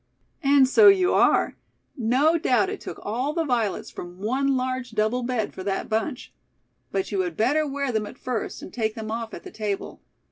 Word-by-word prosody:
"And 275 -2 +5
so 420 - +6
you 380 -2 +6
are. - - +3 0.4
No 265 +6 +3
doubt 320 +7 +2
it 410 - -6
took - - -7
all 250 +8 -2
the 330 0 0
violets 235 -7 -1
from 175 0 -9
one 260 +7 0
large 255 -1 -3
double 220 +3 +1
bed 240 -3 -2
for 185 - -7
that 195 0 -2
bunch. 225 +3 -2 0.6
But 380 - -2
you 200 - -1
had 180 -3 -2
better 290 +8 +2
wear 280 -1 -2
them 215 -2 -1
at - - -11
first, 250 -3 -4
and - - -10
take 220 -2 -1
them 220 -2 -5
off 230 0 -4
at - - -10
the 375 - -10
table. 210 - -4
250 Hz, 200 wpm, -25 LUFS, 215-280 Hz, 0.6 s, so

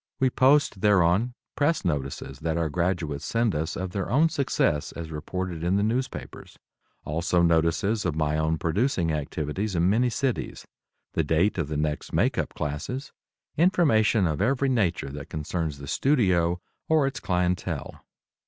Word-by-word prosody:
We 130 -1 +3
post 130 -7 +3
thereon 100 +4 +3 0.2
press 150 - +1
notices 70 -4 -3
that 80 0 -1
our 85 -2 0
graduates 85 -4 -1
send 115 -2 +1
us 80 +1 -2
of 95 0 -4
their 100 0 -3
own 155 +6 +4
success 85 - 0
as 80 -1 -7
reported 85 +2 -4
in 90 +3 +1
the 100 - +2
newspapers; 125 +5 -3 0.5
also 85 +3 +1
notices 85 +6 +2
of 85 -4 -1
my 75 -1 0
own 80 +1 +1
producing 85 - 0
activities 75 +6 -3
in 85 +3 +3
many 120 +4 +3
cities; 130 +2 -2 0.5
the - - +1
date 90 +5 +1
of 80 - -1
the 75 0 -3
next 75 0 -2
makeup - - 0
classes; 75 - -4 0.5
information 145 - +3
of 75 -3 -1
every 135 +1 +2
nature 100 - 0
that 75 +2 -8
concerns 80 -2 -3
the 70 0 -9
studio 90 - +2 0.3
or 155 -3 +4
its 135 -3 -2
clientele. 90 0 -2
90 Hz, 155 wpm, -26 LUFS, 80-115 Hz, 0.5 s, own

